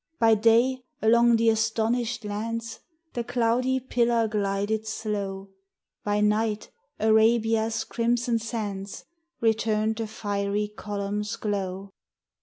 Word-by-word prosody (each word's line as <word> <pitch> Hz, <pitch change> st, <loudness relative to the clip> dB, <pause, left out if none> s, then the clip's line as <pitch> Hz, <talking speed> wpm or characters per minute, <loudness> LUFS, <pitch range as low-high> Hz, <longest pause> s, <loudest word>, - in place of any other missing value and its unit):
By 225 Hz, -1 st, +5 dB
day, 235 Hz, +4 st, +3 dB, 0.2 s
along 235 Hz, +1 st, +5 dB
the 230 Hz, 0 st, +3 dB
astonished 225 Hz, +1 st, 0 dB
lands, 225 Hz, +2 st, -4 dB, 0.3 s
The 240 Hz, -, -2 dB
cloudy 250 Hz, +3 st, +1 dB
pillar 235 Hz, -2 st, +1 dB
glided 210 Hz, +1 st, -1 dB
slow: 200 Hz, -3 st, -4 dB, 0.5 s
By 205 Hz, 0 st, 0 dB
night, 210 Hz, 0 st, 0 dB, 0.3 s
Arabia's 220 Hz, +1 st, +3 dB
crimsoned 235 Hz, 0 st, 0 dB
sands 205 Hz, -4 st, -5 dB, 0.4 s
Returned 220 Hz, -1 st, +1 dB
the 225 Hz, -1 st, -3 dB
fiery 205 Hz, -1 st, -2 dB
column's 205 Hz, 0 st, -4 dB
glow. 195 Hz, -2 st, -3 dB
220 Hz, 100 wpm, -26 LUFS, 210-230 Hz, 0.5 s, By